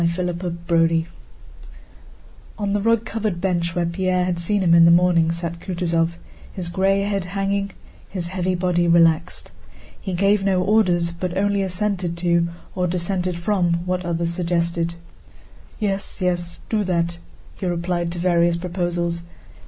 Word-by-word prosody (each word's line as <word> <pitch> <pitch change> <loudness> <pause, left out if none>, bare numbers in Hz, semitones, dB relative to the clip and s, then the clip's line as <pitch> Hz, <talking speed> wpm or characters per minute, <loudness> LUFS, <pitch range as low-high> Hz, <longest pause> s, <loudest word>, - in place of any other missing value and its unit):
CHAPTER 175 +1 0
XXXV 170 -2 +1 1.5
On 205 -1 -1
the 205 - +1
rug 230 +1 +2
covered 215 -6 -2
bench 175 -2 -1
where 175 -1 +1
Pierre 180 +1 0
had 180 -1 -1
seen 195 +3 0
him 170 -2 +4
in 170 0 +8
the - - +7
morning 170 -1 +4
sat 170 0 -4
Kutúzov, 170 -2 -1 0.4
his 175 -3 -5
gray 195 +2 +2
head 200 -2 -1
hanging, 195 +1 -1 0.4
his 175 -3 -4
heavy 185 0 -1
body 175 -1 +1
relaxed. 170 0 +3 0.5
He 190 - -4
gave 195 +2 +2
no 190 -2 +2
orders, 180 -5 +2
but 175 +1 -4
only 200 0 +1
assented 185 -2 -1
to 170 -1 +2 0.3
or 180 -1 0
dissented 180 0 -1
from 175 -2 0
what 180 0 -1
others 170 -1 -1
suggested. 170 -1 -1 0.8
"Yes, 200 -2 -2
yes, 175 -2 -2
do 215 -2 0
that," 170 -1 -1 0.4
he 185 - -2
replied 175 0 -1
to - - -7
various 170 -1 +2
proposals. 175 -1 -2
175 Hz, 145 wpm, -22 LUFS, 170-190 Hz, 1.5 s, in